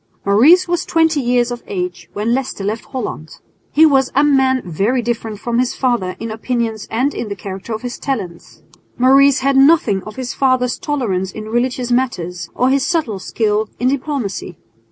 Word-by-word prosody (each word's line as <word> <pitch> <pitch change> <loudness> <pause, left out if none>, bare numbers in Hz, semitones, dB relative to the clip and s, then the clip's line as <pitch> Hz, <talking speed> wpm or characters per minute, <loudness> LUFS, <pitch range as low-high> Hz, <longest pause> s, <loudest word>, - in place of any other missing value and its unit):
Maurice 280 - +5
was 350 0 0
twenty 325 -3 +2
years 245 -1 +1
of 240 - -5
age 180 -2 -4
when 215 +3 -1
Leicester 255 -6 -2
left 215 +3 -3
Holland. 210 -11 -6 0.4
He 315 +2 +6
was 270 -4 +3
a 285 - +4
man 265 -3 +3
very 200 +9 0
different 225 -3 -3
from 235 +2 -1
his 250 -1 0
father 240 -8 0
in 225 -1 -5
opinions 225 -1 -3
and 260 +6 0
in 225 - -5
the 200 - -4
character 195 +3 -8
of 220 +2 -4
his 245 -1 -5
talents. 195 -11 -5 0.3
Maurice 270 +2 +5
had 275 +1 +2
nothing 270 -9 +4
of 215 - -9
his 255 -1 -4
father's 255 -2 +1
tolerance 200 -11 -2
in 215 0 -8
religious 245 +1 -1
matters 180 -9 -1
or 255 +1 +2
his 275 -1 +2
subtle 290 - -1
skill 210 +2 -1
in 250 - +2
diplomacy. 255 - -3
240 Hz, 175 wpm, -17 LUFS, 210-265 Hz, 0.4 s, He